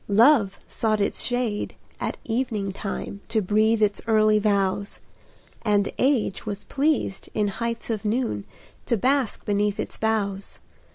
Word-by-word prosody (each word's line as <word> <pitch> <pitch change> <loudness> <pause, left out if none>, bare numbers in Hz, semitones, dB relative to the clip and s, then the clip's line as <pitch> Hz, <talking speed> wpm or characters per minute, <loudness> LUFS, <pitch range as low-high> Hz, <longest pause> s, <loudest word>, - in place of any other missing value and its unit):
Love 215 -1 +5
sought 215 -2 0
its 200 - 0
shade 245 -4 -1 0.2
at - - -3
evening 225 -4 -1
time, 200 +1 -5
To 225 -1 +2
breathe 215 +2 +2
its 205 -1 +1
early 215 -1 +4
vows; 200 -1 0 0.6
And 205 -2 +2
Age 255 -7 +1
was 205 -1 -4
pleased, 280 -8 0
in 210 -1 +2
heights 230 +2 -3
of 215 -3 -2
noon, 215 - -1 0.4
To 235 - +2
bask 260 +1 +1
beneath 205 0 +1
its - - -4
boughs. 200 -3 -1
215 Hz, 135 wpm, -25 LUFS, 200-230 Hz, 0.6 s, Love